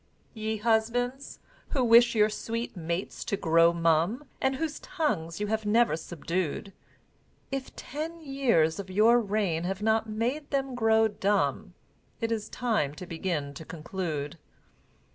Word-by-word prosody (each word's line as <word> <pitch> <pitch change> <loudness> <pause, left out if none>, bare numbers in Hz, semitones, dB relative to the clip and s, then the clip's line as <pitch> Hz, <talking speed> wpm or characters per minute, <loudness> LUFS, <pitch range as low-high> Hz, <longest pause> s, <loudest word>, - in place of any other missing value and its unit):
Ye 220 -1 -2
Husbands, 235 +4 0 0.4
who 265 - +2
wish 235 0 +6
your 210 -1 +5
sweet 230 +2 -4
mates 170 +2 -3
to 200 - -1
grow 165 0 +5
mum, 170 - +2 0.2
And 265 0 +2
whose 305 +1 -3
tongues 210 - -2
you 210 - 0
have 220 +1 -1
never 220 -3 +3
subdued, 175 +3 -3 0.8
If 270 -1 -4
ten 320 +4 -5
years 255 - +1
of 195 -1 -6
your 220 +5 +5
reign 200 -6 0
have 190 +2 -3
not 220 0 +2
made 245 +8 -2
them 270 -2 -1
grow 225 -2 +4
dumb, 205 -1 0 0.4
It 230 -1 -1
is 220 -2 -2
time 215 - 0
to 180 - -8
begin 160 -4 -3
to 150 - -8
conclude. 160 -2 -4
215 Hz, 145 wpm, -28 LUFS, 170-240 Hz, 0.8 s, wish